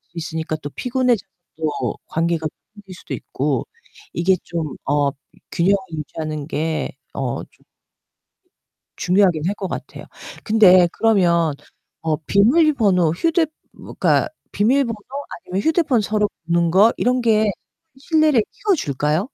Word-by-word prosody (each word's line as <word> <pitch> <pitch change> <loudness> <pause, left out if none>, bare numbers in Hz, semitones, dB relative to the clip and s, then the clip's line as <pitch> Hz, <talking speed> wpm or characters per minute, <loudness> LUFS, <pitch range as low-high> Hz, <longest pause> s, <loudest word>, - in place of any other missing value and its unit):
있으니까 160 -1 -3
또 145 - -4
피곤해져서 250 - 0 0.3
또 155 -2 -2
관계가 165 -1 0 0.3
멀어질 205 -3 -12
수도 - - -8
있고 - - -2 0.5
이게 185 +2 +2
좀 160 -5 -4
어 145 0 +2 0.4
균형을 195 +4 +3 0.2
유지하는 155 -1 -5
게 160 0 -2 0.2
어 - - -3
좀 - - -30 1.3
중요하긴 180 -4 +2
할 200 - -1
것 195 -2 -4
같아요. - - -7 0.4
근데 185 -5 +6
그러면 170 -8 +3 0.5
어 160 -2 0
비밀번호, 210 - +3
휴대 330 - +1 0.3
그니까 - - 0 0.2
비밀번호 235 +3 +2 0.5
아니면 185 +2 -1
휴대폰 310 - +2
서로 210 0 0 0.2
보는 170 0 +2
거 205 +6 +5
이런 250 +1 +1
게 220 -3 +3 0.5
신뢰를 305 -3 +3
키워줄까요? 155 - 0
190 Hz, 265 characters per minute, -20 LUFS, 160-230 Hz, 1.3 s, 근데